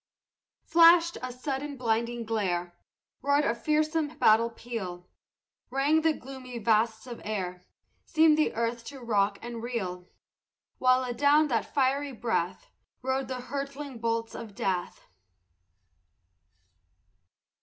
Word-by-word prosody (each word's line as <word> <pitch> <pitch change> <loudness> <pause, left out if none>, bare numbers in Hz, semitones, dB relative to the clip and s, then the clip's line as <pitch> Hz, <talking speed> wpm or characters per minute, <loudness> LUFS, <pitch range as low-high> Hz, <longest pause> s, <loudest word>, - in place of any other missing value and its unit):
Flashed 335 0 +6
a 255 0 -4
sudden 275 +3 -4
blinding 235 0 -1
glare; 180 -6 -1 0.5
Roared 285 +2 +2
a - - +2
fearsome 305 +3 0
battle 225 +2 +5
peal; 195 -7 -6 0.6
Rang 280 +5 +2
the 320 0 +3
gloomy 260 -4 -8
vasts 220 +1 +1
of 240 -2 -8
air; 180 -4 -4 0.4
Seemed 315 -1 +4
the 310 0 +1
earth 230 +1 -1
to 275 +1 -8
rock 205 -4 +1
and 235 -1 -6
reel; 185 -7 -4 0.7
While 255 0 +4
adown 285 +5 +3
that 230 -3 -1
fiery 275 +1 +1
breath 190 -6 -2 0.3
Rode 265 +1 -1
the 255 -1 -4
hurtling 275 -1 -5
bolts 230 0 -1
of 215 -3 -8
death. 185 -3 -2
245 Hz, 115 wpm, -28 LUFS, 225-280 Hz, 0.7 s, Flashed